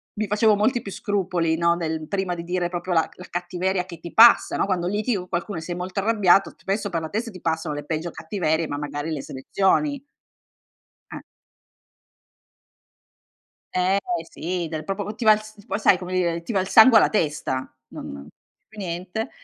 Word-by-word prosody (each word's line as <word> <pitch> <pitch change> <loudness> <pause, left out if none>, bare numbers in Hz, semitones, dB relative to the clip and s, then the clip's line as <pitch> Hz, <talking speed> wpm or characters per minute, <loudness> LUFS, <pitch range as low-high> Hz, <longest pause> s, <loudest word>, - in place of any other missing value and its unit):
mi 215 0 -2
facevo 210 +1 +3
molti 235 +4 +1
più 200 - -7
scrupoli, 180 -6 -1
no, 170 0 +3
nel 160 -2 -3
prima 190 -3 -2
di 170 - -6
dire 175 0 -1
proprio 175 0 -3
la 160 -1 +3
c - - -23
la 180 - -10
cattiveria 180 +1 -2
che 170 -3 -10
ti 170 0 -9
passa, 235 +1 +7
no? - - +1
Quando 180 -3 0
litighi 210 +4 0
con 180 0 -7
qualcuno 175 +2 -3
e - - -4
sei 175 +1 -5
molto 185 +2 -4
arrabbiato, 195 -3 +3
spesso 200 +1 -3
per 165 -3 -2
la 160 - -5
testa 225 +3 -3
ti 185 - -12
passano 160 -2 -1
le 145 - -5
peggio 160 +2 -3
cattiverie, 160 -2 -1
ma 145 - -4
magari 145 +1 -4
le 145 -3 -3
selezioni. 225 - 0 1.1
Eh. - - -7 2.5
Eh 185 +2 +2 0.3
sì, 180 - -3
dal 155 -1 -4
proprio 195 +4 -3
po 210 +1 -6
ti 235 - -5
va 215 - +8
il 210 - -1
s 215 -1 -15
poi 200 -2 -3
sai 195 - +5
come 180 0 -7
dire, 170 -2 0
ti 230 - -5
va 195 - +2
il 185 - -2
sangue 225 +2 +8
alla - - +4
testa, 145 -8 -2
non 70 +1 -9 0.4
più 220 - -18
niente. 185 +3 -4
180 Hz, 195 wpm, -23 LUFS, 165-205 Hz, 2.5 s, va